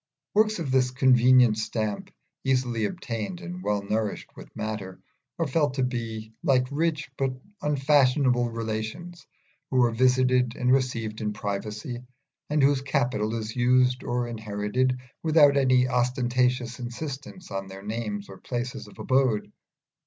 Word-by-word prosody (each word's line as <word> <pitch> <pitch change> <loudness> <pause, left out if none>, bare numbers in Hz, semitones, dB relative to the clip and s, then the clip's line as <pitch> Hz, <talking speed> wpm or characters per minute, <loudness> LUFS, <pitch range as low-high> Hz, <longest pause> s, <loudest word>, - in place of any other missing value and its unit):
Works 215 +1 +3
of 160 -6 -3
this 130 -1 +3
convenient 125 -3 +5
stamp, 110 -1 -3 0.3
easily 125 -4 +1
obtained 135 - -4
and 180 -1 -7
well 105 - -1
nourished 105 +1 -2
with - - -11
matter, 105 -4 -5 0.4
are 165 - 0
felt 145 -1 +1
to 130 - +1
be 115 -3 -4
like 130 -2 +3
rich 150 -1 -1
but 130 -1 -1 0.2
unfashionable 135 -3 +3
relations 115 +10 -5 0.4
who 130 -1 +3
are 120 - +3
visited 125 0 +3
and 125 0 +1
received 115 -5 0
in 105 -1 -1
privacy, 105 +4 -4 0.5
and 150 -1 +2
whose 140 -1 +4
capital 120 -5 0
is 110 -1 -4
used 125 +1 +3
or 120 0 -1
inherited 110 +3 -1 0.2
without 155 -3 +5
any 130 -2 +4
ostentatious 125 0 0
insistance 135 - -7
on 95 0 -4
their 95 +1 -10
names 105 -1 -4
and 95 -1 -12
places 120 0 -4
of - - -15
abode. 130 -5 +1
125 Hz, 140 wpm, -26 LUFS, 110-135 Hz, 0.5 s, convenient